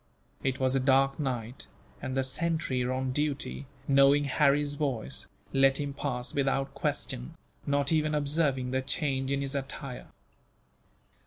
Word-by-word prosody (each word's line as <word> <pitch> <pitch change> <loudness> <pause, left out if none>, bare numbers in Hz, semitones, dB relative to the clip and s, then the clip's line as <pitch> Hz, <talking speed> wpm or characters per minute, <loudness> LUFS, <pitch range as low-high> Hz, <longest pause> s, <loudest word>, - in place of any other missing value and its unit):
It 135 0 0
was 130 0 +2
a - - +3
dark 135 +1 +3
night, 125 -3 -3 0.3
and 130 -1 -3
the 135 - +2
sentry 135 -2 0
on 130 +1 -1
duty, 145 0 -2 0.2
knowing 140 +1 +5
Harry's 145 +1 +3
voice, 130 - -2 0.3
let 135 0 +5
him 145 -1 -2
pass 125 -3 -2
without 135 0 0
question, - - -2 0.3
not 145 +1 +2
even 155 -1 +2
observing 140 -3 +1
the 130 0 +1
change 135 -1 -1
in 140 0 0
his 135 0 -3
attire. 135 -1 -5
135 Hz, 140 wpm, -29 LUFS, 130-145 Hz, 0.3 s, knowing